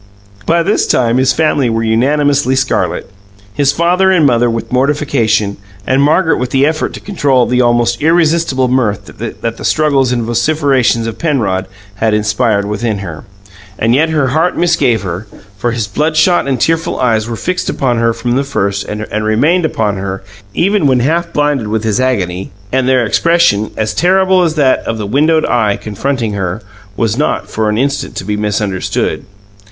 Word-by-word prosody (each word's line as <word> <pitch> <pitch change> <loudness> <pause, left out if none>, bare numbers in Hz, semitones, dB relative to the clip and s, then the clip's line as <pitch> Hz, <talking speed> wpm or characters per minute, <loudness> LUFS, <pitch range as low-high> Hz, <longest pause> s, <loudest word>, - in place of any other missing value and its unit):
By 170 +1 +2
this 200 +5 +1
time 120 -1 +2
his 130 +1 +3
family 150 -5 +1
were 115 0 -1
unanimously 135 +4 +1
scarlet 130 -1 -1 0.5
his 140 +6 +2
father 175 +5 +2
and 180 -5 +3
mother 120 -2 +3
with 115 -1 -4
mortification, 125 -6 0 0.3
and 130 +1 +2
Margaret 155 +2 +2
with 125 0 -2
the 135 +2 +2
effort 155 +1 -1
to - - -7
control 140 -11 +1
the 125 +1 +1
almost 120 -1 +1
irresistible 160 -4 +2
mirth 125 -6 0
that 115 0 -5
the - - -9
struggles 140 -4 +2
and 120 -2 0
vociferations 125 -1 +1
of 115 -1 -5
Penrod 110 - -1 0.3
had 110 0 +1
inspired 105 -1 0
within 105 +1 -2
her. 85 -6 -8 0.5
And 115 +1 +1
yet 155 +5 +2
her 150 -5 +1
heart 160 +6 0
misgave 145 - +1
her, 95 +3 -5 0.3
for 105 +4 -2
his 115 -2 -2
bloodshot 155 - +1
and 130 -3 -1
tearful 165 +5 0
eyes 115 -3 +1
were 115 - -3
fixed 180 +10 -3
upon 125 -3 0
her 115 0 +2
from 115 +1 -3
the 135 +3 +1
first 100 -8 -2
and 105 0 -5 0.2
remained 145 +12 +2
upon 105 -9 -1
her, 95 0 -5 0.3
even 195 -3 +2
when 130 -2 +2
half 170 +6 0
blinded 145 -7 0
with 110 +1 -2
his 110 -1 0
agony; 95 -8 -1 0.2
and 130 0 +1
their 130 -2 +3
expression 165 -6 +2
as 110 -1 -1
terrible 190 +1 +3
as 165 -3 0
that 140 -4 +3
of 115 - -4
the 105 - -4
windowed 155 +8 +2
Eye 105 -4 +1
confronting 115 +1 -3
her 95 +1 -3 0.3
was 115 +2 0
not 150 - -1
for 110 -1 -1
an 105 - -1
instant 140 +3 -2
to - - -4
be 105 +1 -2
misunderstood. 105 -2 -2
125 Hz, 175 wpm, -13 LUFS, 110-150 Hz, 0.5 s, his